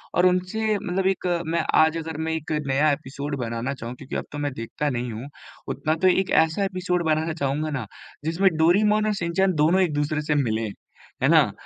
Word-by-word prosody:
और 175 - +4
उनसे 185 +4 +1
मतलब 185 0 -2
एक 190 -1 0 0.2
मैं 165 +1 +1 0.2
आज 160 +1 +3
अगर 160 -1 -5
मैं 160 - -1
एक 160 0 -4 0.2
नया 145 +3 +3
एपिसोड 140 0 -4
बनाना 115 +3 -2
चाहूँ, 120 -1 -7
क्योंकि 135 +1 -8
अब - - -2
तो 145 - -6
मैं 145 -1 -2
देखता 120 +6 -3
नहीं 125 -1 -3
हूँ 115 +6 -7 0.4
उतना, 155 +1 -1
तो 185 +3 +2
एक 185 +1 +2
ऐसा 160 +5 +3
एपिसोड 180 -2 -1
बनाना 160 +1 +1
चाहूँगा 150 0 -1
ना 115 - -5 0.4
जिसमें 175 +4 +3
डोरिमॉन 210 +6 +4
और 210 - +1
शिनचैन 180 +2 +1
दोनों 160 +5 +3
एक-दूसरे 150 -2 0
से 150 0 0
मिले, 115 -5 0 0.6
है - - +5
ना? - - +5
160 Hz, 195 wpm, -24 LUFS, 140-180 Hz, 0.6 s, है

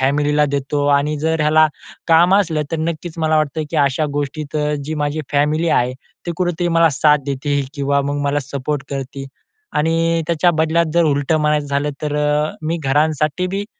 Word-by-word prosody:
फॅमिलीला 145 +2 +2
देतो. 145 +1 -1
आणि 145 +1 +2
जर 160 0 0
ह्याला 155 +1 +5 0.4
काम 170 +3 +5
असलं 165 -6 +1
तर - - +1
नक्कीच 165 +1 -4
मला 155 -1 +2
वाटतं, 155 +1 0
की 165 - -3
अशा 145 +1 +2
गोष्टीत 145 +1 -4 0.3
जी 155 +2 -4
माझी 150 +1 -2
फॅमिली 150 +3 +1
आहे, 125 -2 +2 0.3
ते 170 - -1
कुठेतरी 175 -1 -1
मला 165 0 +4
साथ 150 +2 +3
देती 140 +1 -1
किंवा 140 0 +1
मग 145 +1 -2
मला 145 +1 0
सपोर्ट 140 +1 -4
करती. 135 0 -5 0.5
आणि 165 +1 +1
त्याच्या 170 +2 +2
बदल्यात 160 +1 +2
जर 170 -1 +4
उलटं 145 +1 +1
म्हणायचं 150 -1 +1
झालं, 140 +1 -1
तर 150 -1 -2
अ, 150 +1 +1
मी 160 +2 -1
घरांसाठीबी 155 +7 0
150 Hz, 170 wpm, -18 LUFS, 145-160 Hz, 0.5 s, ह्याला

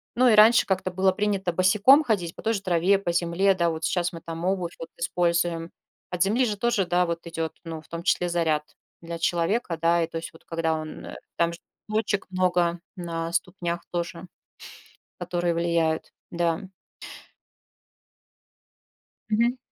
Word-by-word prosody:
ну 255 +1 +4
и - - +5
раньше 220 +2 +7
как-то 185 -1 -1
было 190 +1 +3
принято 200 -2 0
босиком 210 - +5
ходить 190 - -1
по - - -10
той 225 - +1
же 200 - -2
траве, 185 +1 +3
по 175 -3 -2
земле, 175 +3 +2
да. 170 -2 +1
Вот 160 0 -4
сейчас 175 0 0
мы 165 - -8
там 165 +1 -6
обувь 185 -2 -1
вот 165 - -7
используем. 170 -1 0 0.4
От 180 0 +1
земли 225 +6 +2
же 210 -3 -2
тоже, 235 -2 +1
да, 180 +1 +2
вот 170 0 -4
идет, 165 -1 -3
ну, 165 -2 -6
в - - -23
том 170 0 -6
числе 180 0 +1
заряд 160 -3 +1 0.4
для 170 0 -6
человека, 175 +3 0
да. 170 0 +3
И - - -2
то 165 - -6
есть 170 +1 -6
вот 160 - -17
когда 165 -1 -1
он, 155 0 -7 0.3
там 170 0 +2
же 170 - -10 0.3
точек 215 -2 -1
много 175 -2 +1 0.2
на 165 -2 -4
ступнях 175 -2 -2
тоже, 175 0 -4 0.9
которые 175 -1 -1
влияют, 165 -1 0 0.2
да. 170 +2 -1 2.6
Мгм. 235 +4 +2
175 Hz, 165 wpm, -25 LUFS, 170-195 Hz, 2.6 s, раньше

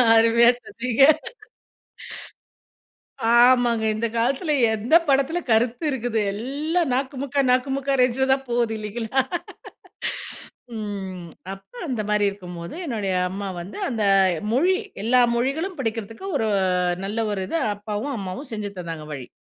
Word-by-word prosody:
அருமையா 230 +1 +6 0.2
சொன்னீங்க. 250 +2 +1 2.3
ஆமாங்க. 240 -2 +5
இந்த 230 +2 -1
காலத்துல 270 +7 +1 0.2
எந்த 220 +8 +2
படத்துல 275 +5 +2
கருத்து 240 +5 +2
இருக்குது. 245 -4 -1
எல்லாம் 290 - -1
நாக்குமுக்க 275 +1 -1
நாக்குமுக்கா 270 +2 +1
ரேஞ்ச்ல 255 +2 +2
தான் 270 0 -3
போது 235 -2 +1
இல்லைங்களா? 220 +4 -1 1.6
ம். 190 -4 -5 0.3
அப்ப 195 - -14 0.2
அந்த 250 -6 -1
மாரி 210 -1 +2
இருக்கும்போது 180 - -8
என்னுடைய 210 -8 -2 0.2
அம்மா 195 +2 -5
வந்து, 185 - -9
அந்த 225 -4 -1 0.5
மொழி 350 +9 +3 0.3
எல்லா 250 +3 +4
மொழிகளும் 310 +9 -1
படிக்கிறதுக்கு 225 - -4
ஒரு 220 - 0 0.6
நல்ல 220 +3 -1
ஒரு 195 -2 -2
இது - - 0 0.2
அப்பாவும், 210 +7 -4
அம்மாவும் 200 +8 -6
செஞ்சு 210 -2 -4
தந்தாங்க 165 -3 -6
வழி. 130 -4 -7
235 Hz, 115 wpm, -23 LUFS, 210-265 Hz, 2.3 s, அருமையா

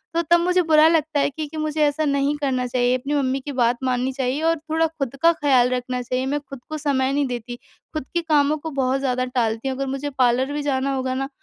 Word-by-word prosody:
तो 335 - +3
तब 345 - +7
मुझे 360 +1 +2
बुरा 315 -1 +5
लगता 315 -2 +1
है 280 - +2
क्योंकि 305 +2 -6
मुझे 310 0 -2
ऐसा 295 +1 +1
नहीं 280 0 +1
करना 260 -3 0
चाहिए 250 0 +1
अपनी 275 +3 -4
मम्मी 270 -2 0
की 290 - -4
बात 240 -2 +1
माननी 255 0 0
चाहिए 265 +2 -2
और 330 - +2
थोड़ा 320 +1 0
खुद 280 -5 -5
का 335 - +6
ख़याल 270 -6 +3
रखना 250 0 -2
चाहिए 255 +1 -2
मैं 285 +2 -1
खुद 275 - -8
को 310 - -3
समय 275 -3 0
नहीं 285 0 +1
देती। 245 -1 -5 0.4
खुद 310 -4 -4
के 345 - +1
कामों 305 -2 +2
को 320 +2 -6
बहुत 270 -1 0
ज़्यादा 255 -2 0
टालती 235 -1 -1
हूँ, 260 - -2
अगर 275 0 -2
मुझे 275 +2 -3
पार्लर 255 +2 +2
भी 295 - -2
जाना 275 -1 0
होगा 260 -1 -2
ना 270 +1 -3
275 Hz, 240 wpm, -22 LUFS, 255-305 Hz, 0.4 s, तब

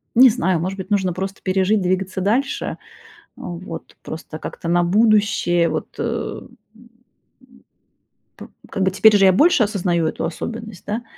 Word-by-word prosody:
не 255 +2 +8
знаю, 190 -7 0
может 185 +4 -3
быть, 190 0 -7
нужно 190 -3 +1
просто 195 +2 -5
пережить, 190 +2 +1
двигаться 185 +1 -1
дальше. 235 +9 -1 0.6
Вот. 170 -1 -8
Просто 160 0 -8
как-то 165 - -7
на 175 +1 +3
будущее. 205 -3 +2
Вот, 155 - -3
эм, - - -4 0.2
м 235 +1 -19 1.5
п - - -10 0.2
Как 195 - -2
бы 190 - +2
теперь 215 +3 +5
уже 195 -1 +5
я 190 - +6
больше 300 - +4
осознаю 180 -6 0
эту 155 - -3
особенность, 220 +4 -6
да, 225 +3 -3
190 Hz, 150 wpm, -20 LUFS, 175-215 Hz, 1.5 s, не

